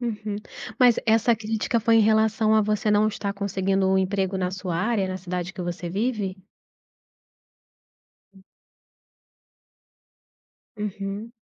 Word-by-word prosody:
Uhum. 215 Hz, -3 st, -3 dB, 0.4 s
Mas 245 Hz, -2 st, +6 dB
essa 230 Hz, +1 st, +3 dB
crítica 220 Hz, +2 st, -1 dB
foi 230 Hz, +1 st, +3 dB
em -, -, +6 dB
relação 220 Hz, 0 st, +3 dB
a 220 Hz, -, +5 dB
você 210 Hz, +1 st, 0 dB
não 210 Hz, +1 st, +4 dB
estar 205 Hz, -2 st, -3 dB
conseguindo 195 Hz, -1 st, 0 dB
um 190 Hz, -, +3 dB
emprego 190 Hz, 0 st, 0 dB
na 180 Hz, -1 st, -1 dB
sua 185 Hz, -3 st, -3 dB
área, 205 Hz, +1 st, 0 dB
na 185 Hz, -, -3 dB
cidade 180 Hz, -1 st, -4 dB
que -, -, -8 dB
você 175 Hz, 0 st, -4 dB
vive? 205 Hz, -2 st, -2 dB, 2.0 s
Hum. 190 Hz, -, -19 dB, 2.3 s
Uhum. 205 Hz, +2 st, -5 dB
205 Hz, 125 wpm, -24 LUFS, 190-220 Hz, 2.3 s, Mas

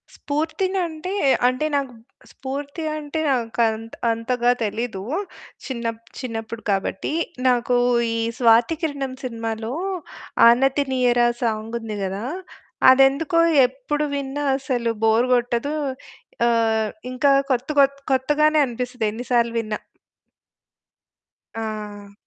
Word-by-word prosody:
స్పూర్తినంటే 335 Hz, +3 st, -2 dB, 0.3 s
అంటే 255 Hz, +4 st, 0 dB
నాకు 275 Hz, -3 st, -1 dB, 0.4 s
స్ఫూర్తి 280 Hz, +4 st, -6 dB
అంటే 300 Hz, +1 st, -4 dB
నాకు 235 Hz, -3 st, 0 dB
అంత 225 Hz, +1 st, -5 dB, 0.2 s
అంతగా 240 Hz, +2 st, +1 dB
తెలీదు. 220 Hz, -2 st, -3 dB, 0.6 s
చిన్నప్ 230 Hz, -3 st, -4 dB, 0.2 s
చిన్నప్పుడు 230 Hz, -2 st, -5 dB
కాబట్టి. 195 Hz, +7 st, -2 dB, 0.3 s
నాకు 245 Hz, 0 st, +2 dB, 0.4 s
ఈ -, -, -1 dB, 0.2 s
'స్వాతికిరణం' 270 Hz, +3 st, +2 dB
సినిమాలో 225 Hz, -1 st, -4 dB, 0.7 s
'ఆనతినీయర' 255 Hz, -1 st, +3 dB, 0.2 s
సాంగుంది 225 Hz, -1 st, -3 dB
కదా! 195 Hz, +3 st, -3 dB, 0.7 s
అదెందుకో 275 Hz, +5 st, +4 dB, 0.3 s
ఎప్పుడు 285 Hz, +3 st, -3 dB
విన్నా 280 Hz, +1 st, -3 dB
అసలు 245 Hz, -4 st, -1 dB
బోర్ 225 Hz, +3 st, +4 dB
కొట్టదు. 245 Hz, +4 st, 0 dB, 0.7 s
ఆహ్, 225 Hz, -2 st, +2 dB, 0.2 s
ఇంకా 270 Hz, +2 st, +3 dB, 0.2 s
కొత్త 255 Hz, +2 st, 0 dB
కొ 275 Hz, -, +9 dB, 0.3 s
కొత్తగానే 300 Hz, +4 st, +3 dB
అనిపిస్తది. 245 Hz, -1 st, -3 dB
ఎన్ని 235 Hz, +4 st, -7 dB
సార్లు 235 Hz, -1 st, +2 dB
విన్నా. 215 Hz, -1 st, -3 dB, 1.8 s
ఆ! 210 Hz, -2 st, -6 dB
245 Hz, 95 wpm, -22 LUFS, 225-275 Hz, 1.8 s, కొ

